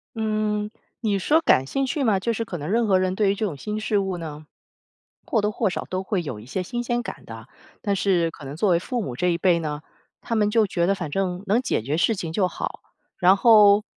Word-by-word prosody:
嗯， 215 -1 -1 0.3
你 210 -4 0
说 300 - +3
感 135 - +4
兴 270 - -1
趣 285 +1 -1
吗？ 215 -6 +2
就 230 +5 -1
是 230 +1 -3
可 180 - -5
能 150 +1 -5
任 230 +3 +2
何 190 -2 +4
人 185 0 0
对 200 -1 +2
于 - - -1
这 215 - -1
种 155 -7 -6
新 210 +8 -4
事 215 -1 0
物 190 -2 -1
呢， 155 -2 -8 0.8
或 225 - +1
多 210 - +1
或 210 -2 0
少 - - -4
都 185 +1 -2
会 190 -1 -1
有 135 -10 -6
一 105 - -12
些 185 +9 -3
新 240 +7 -4
鲜 240 0 -1
感 - - -8
的。 115 0 -10 0.3
但 200 -1 0
是 180 -3 +2
可 150 - -12
能 135 +2 -6
作 195 +5 +1
为 175 - +4
父 240 +7 -3
母 130 - -5
这 180 - 0
一 170 -1 0
辈 180 -1 +3
呢， 150 -2 -4 0.4
他 230 - -3
们 210 -1 +2
就 220 -1 +3
觉 175 -2 0
得 195 - +3
反 175 -5 -5
正 185 +3 -2
能 210 +5 +3
解 255 - 0
决 140 +7 -2
事 220 +6 +2
情 165 -4 -5
就 185 +2 +1
好。 - - -6 0.4
然 185 +1 +5
后， 210 -2 +6
195 Hz, 270 characters per minute, -24 LUFS, 170-215 Hz, 0.8 s, 后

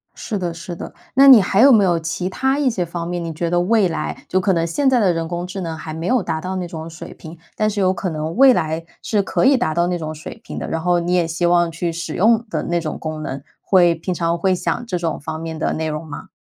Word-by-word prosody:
是 210 - -4
的， 175 -2 -3
是 170 +1 -7
的， - - -8 0.2
那 275 +1 +7
你 255 -6 +10
还 195 +3 +2
有 275 +1 +8
没 215 -4 +6
有 175 -3 +2
其 170 +3 -3
他 265 +7 0
一 285 -3 +2
些 195 -7 -1
方 170 0 -5
面， 175 -1 -3
你 165 - -4
觉 170 +2 -2
得 175 0 +2
未 210 0 +3
来 165 - -5
就 185 - +1
可 190 0 +1
能 165 -1 +1
现 265 - +1
在 255 -2 +3
的 190 -5 +3
人 165 -1 -3
工 175 +1 -4
智 190 +1 -6
能 165 -2 -4
还 155 0 -7
没 165 +2 -4
有 250 -5 +2
达 160 -1 -3
到 185 +2 -4
那 180 -1 -3
种 160 -1 -7
水 160 -1 -10
平， 160 +1 -11 0.2
但 215 0 +1
是 210 -1 -3
有 185 -1 +3
可 185 0 -3
能 155 +2 -4
未 265 +1 +7
来 160 -4 -1 0.2
是 210 -2 +1
可 195 - 0
以 275 0 +5
达 160 -10 0
到 170 +1 +1
那 180 -1 -1
种 155 -1 -5
水 155 - -9
平 - - -8
的。 - - -4
然 165 - -2
后 175 0 +2
你 175 +1 -1
也 175 -2 +2
希 170 +2 -1
望 175 -1 +3
去 170 +1 -3
使 165 -1 -5
用 225 +3 +3
的 - - -2
那 175 0 0
种 155 -2 -4
功 155 -1 -5
能， 135 -2 -5 0.2
会 175 -3 +4
平 165 +3 -4
常 170 0 -1
会 185 +2 +1
想 185 +7 -2
这 180 - -2
种 165 -2 -2
方 155 +2 -5
面 160 0 -5
的 - - 0
内 160 0 -2
容 155 +1 -4
吗？ 145 - -8
175 Hz, 305 characters per minute, -20 LUFS, 165-190 Hz, 0.2 s, 你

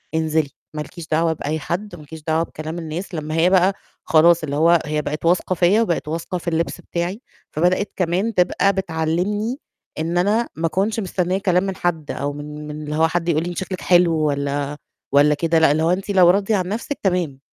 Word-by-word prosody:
انزلي، 160 -2 +1 0.3
ما 150 - -2
لكيش 165 +2 -9
دعوة 165 +1 +2
بأي 155 +1 -3
حد، 180 +5 -4
ما 155 - -12
لكيش 155 +1 -11
دعوة 160 +1 +1
بكلام 160 +1 -6
الناس." 170 +4 -6
لمّا 155 0 -4
هي 170 +2 +4
بقى 190 +1 +4 0.3
خلاص 170 0 +4
اللي 145 -2 -3
هو 170 +1 +5
هي 150 0 -1
بقت 150 +3 -4
واثقة 180 +2 +2
فيّا 190 +6 +4
وبقت 170 -8 -1
واثقة 165 +3 -3
في 175 - -11
اللبس 170 +2 -2
بتاعي، 175 +7 -3 0.3
فبدأت 180 +5 +1
كمان 185 +5 0
تبقى 190 +2 +2
بتعلّمني 190 - -1 0.4
إن 165 +2 -1
أنا 210 +6 +2
ما 165 +1 0
أكنش 200 +6 0
مستنية 185 -1 -1
كلام 185 -2 +2
من 195 -1 -3
حد 160 -4 -2
أو 145 0 -3
من 150 +1 -8
من 150 0 -6
اللي 150 0 -4
هو 160 +1 +4
حد 175 +1 -1
يقول 160 0 +2
لي 175 - -3
أنتِ 175 - -7
شكلِك 185 -1 -4
حلو 175 -2 +4
والّا 145 -1 -1 0.4
والّا 145 +1 +5
كده 165 +1 +2
لأ، 160 -3 +5
اللي 155 +2 +1
هو 170 - +3
أنتِ 195 +2 -2
لو 180 -3 +6
راضية 200 +3 +2
عن 185 -2 -1
نفْسِك 230 +8 -4
تمام. 175 -8 0
170 Hz, 210 wpm, -21 LUFS, 155-185 Hz, 0.4 s, لو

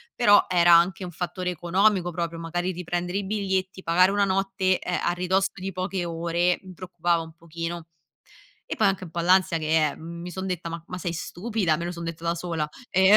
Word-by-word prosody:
però 205 -4 +6
era 175 -1 +5
anche 170 +2 +4
un 180 - -6
fattore 180 +1 -3
economico 180 +2 +2
proprio, 170 -1 -3
magari 175 +2 -2
riprendere 175 +1 -3
i 200 - -4
biglietti 190 -2 -2
pagare 180 +3 +4
1 200 0 +2
notte, 190 -1 +1
ehm, 180 - -2
a - - +2
ridosso 185 +2 +1
di 190 +1 -5
poche 185 0 -3
ore, 170 +1 0
mi 185 -1 -11
preoccupava 175 -2 -1
un 160 -1 -10
pochino; 170 0 -6 0.8
e - - -5
poi 215 - +3
anche 195 -1 0
un 170 - -10
po' 170 - -3
l'ansia 180 -1 +4
che, 155 0 +2
eh, 145 - -7
mhmm 170 +1 -8
mi 180 - -6
son 190 +1 -5
detta: 175 -2 -3
"Ma 165 0 -6
ma 180 - -6
sei 175 -2 -3
stupida?" 180 0 -1
Me 170 - -4
lo 175 - -3
son 170 -1 -7
detta 165 0 -6
da 170 0 +1
sola, 165 -3 -3 0.2
ehm, 190 +2 +6
175 Hz, 215 wpm, -25 LUFS, 170-190 Hz, 0.8 s, però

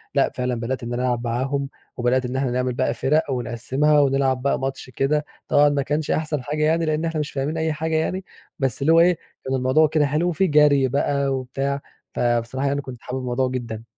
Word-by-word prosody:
لأ، - - +3
فعلًا 125 -1 -1
بدأت 120 +2 -3
إن 120 +1 -4
أنا 125 +1 -1
ألعب 120 -1 0
معاهم، 135 +4 -1 0.3
وبدأت 125 +1 +1
إن 125 +1 -4
إحنا 135 -2 0
نعمل 125 0 0
بقى - - 0
فِرَق 150 +1 +1
ونقسِّمها 130 +5 +1
ونلعب 135 -2 +2
بقى 140 - +1
ماتش 135 -1 -4
كده. 150 +3 0 0.2
طبعًا 145 0 +5
ما 145 -1 0
كانش 150 +2 -1
أحسن 155 -4 -1
حاجة 150 +2 -2
يعني 165 +1 +2
لأن 155 +1 0
إحنا 165 -1 -2
مش 150 - -3
فاهمين 145 +4 -2
أي 160 -1 0
حاجة 160 +1 -2
يعني، 180 +4 -1 0.3
بس 135 -2 0
اللي 160 +4 +4
هو 165 - +6
إيه 175 0 +4 0.3
كان 135 0 -1
الموضوع 130 +5 +3
كده 150 -1 +2
حلو، 155 +5 +1
وفيه 185 +3 +1
جري 145 -3 +5
بقى 140 +1 0
وبتاع، 135 +1 -2 0.3
فبصراحة 120 +3 0
يعني 140 +1 0
كنت 125 -3 -9
حابب 130 +1 -4
الموضوع 130 +1 0
جدًا. 115 -3 -5
135 Hz, 210 wpm, -22 LUFS, 125-150 Hz, 0.3 s, هو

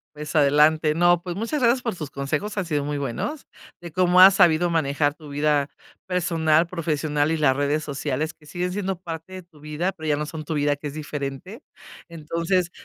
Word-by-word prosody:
Pues, 150 +1 -5
adelante. 150 +2 +4
No, 175 0 +4
pues, 175 -1 -4
muchas 230 +9 -2
gracias 245 +1 +3
por 230 -6 -3
sus 150 -4 -6
consejos, 150 +11 -3
han 195 - -1
sido 150 -3 -1
muy 145 0 -3
buenos, 140 - -4 0.3
de 170 - -9
cómo 180 +2 +3
has 190 +1 +9
sabido 175 -2 +4
manejar 145 -2 +1
tu 150 -1 -14
vida 145 0 +1 0.4
personal, 165 -3 +1
profesional 155 -3 -1
y - - 0
las 135 -4 +2
redes 145 +2 0
sociales, 145 +2 -3
que 150 - -23
siguen 180 +3 -3
siendo 195 -1 -2
parte 165 0 -8
de 185 -1 -7
tu 170 -3 -22
vida, 150 +5 -2
pero 160 -4 -9
ya 150 - +2
no 150 - -2
son 155 0 -7
tu 160 - -4
vida, 145 -1 +1
que 145 +1 -9
es 145 - -5
diferente. 150 - -6 0.5
Entonces, 170 +2 -1
155 Hz, 200 wpm, -23 LUFS, 150-180 Hz, 0.5 s, has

